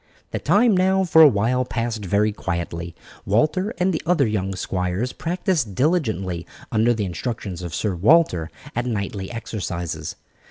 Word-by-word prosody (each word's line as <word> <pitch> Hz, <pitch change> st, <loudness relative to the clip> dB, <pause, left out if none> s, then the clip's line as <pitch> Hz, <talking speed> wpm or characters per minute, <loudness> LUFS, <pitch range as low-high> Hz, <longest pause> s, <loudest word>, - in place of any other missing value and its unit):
The -, -, -2 dB
time 220 Hz, 0 st, +4 dB
now 190 Hz, +1 st, +3 dB
for 160 Hz, -3 st, +5 dB
a 155 Hz, -, +11 dB
while 125 Hz, +2 st, +2 dB
passed 115 Hz, -3 st, -3 dB
very 105 Hz, +3 st, +2 dB
quietly. 85 Hz, -3 st, -4 dB, 0.3 s
Walter 155 Hz, -, +1 dB
and 180 Hz, +2 st, +1 dB
the 160 Hz, -, -2 dB
other 165 Hz, -5 st, +3 dB
young 95 Hz, -3 st, -1 dB
squires 95 Hz, +6 st, -2 dB
practised 165 Hz, -, -1 dB
diligently, 110 Hz, -, 0 dB, 0.2 s
under 115 Hz, +1 st, +3 dB
the 105 Hz, -2 st, -1 dB
instructions 95 Hz, -1 st, -4 dB
of 85 Hz, -3 st, -5 dB
Sir 105 Hz, -3 st, -1 dB
Walter, 90 Hz, -, +3 dB, 0.3 s
at 120 Hz, +1 st, -1 dB
knightly 100 Hz, -3 st, -3 dB
exercises. 85 Hz, -9 st, -4 dB
110 Hz, 150 wpm, -22 LUFS, 95-155 Hz, 0.3 s, a